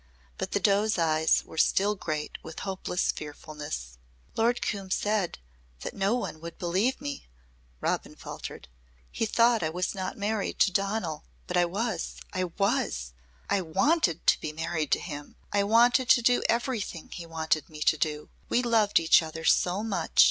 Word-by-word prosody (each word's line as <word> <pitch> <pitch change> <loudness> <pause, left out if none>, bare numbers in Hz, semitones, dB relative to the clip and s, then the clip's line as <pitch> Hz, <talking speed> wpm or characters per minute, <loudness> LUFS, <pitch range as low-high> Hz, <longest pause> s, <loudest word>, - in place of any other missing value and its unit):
But - - -3
the - - +2
doe's 205 +2 +2
eyes 160 -1 +3
were 160 - -6
still 205 +2 +3
great 155 -6 -4
with 160 - -8
hopeless 190 -2 -1
fearfulness. 150 - -7 0.4
"Lord 235 +2 +2
Coombe 195 -3 -3
said 205 -1 0 0.4
that - - -5
no 200 +3 +1
one 160 -10 -4
would 170 0 -8
believe 190 +9 0
me," 285 0 -6 0.5
Robin - - -1
faltered. - - -8 0.4
"He 225 - -1
thought 230 +1 +4
I 155 - 0
was 180 +3 -2
not 190 -2 -4
married 205 0 -1
to 195 - +5
Donal. 195 -4 -1 0.2
But - - -4
I 175 - +4
was 200 +1 -2 0.2
I 185 0 0
was. 115 - -1 0.3
I 200 - +1
wanted 185 - +1
to - - +5
be 155 - -3
married 160 -1 -2
to - - +2
him. 145 -4 -7 0.2
I 200 - +3
wanted 240 +4 +4
to 240 - +6
do 245 +1 +4
everything 230 -8 -1
he 170 -1 -7
wanted 160 -2 -1
me 155 -1 -10
to 155 - +4
do. 150 0 -2 0.2
We 245 - +2
loved 225 -4 +4
each 165 0 +6
other 160 0 -6
so 185 +5 +3
much. 220 -3 -2
185 Hz, 170 wpm, -28 LUFS, 160-220 Hz, 0.5 s, to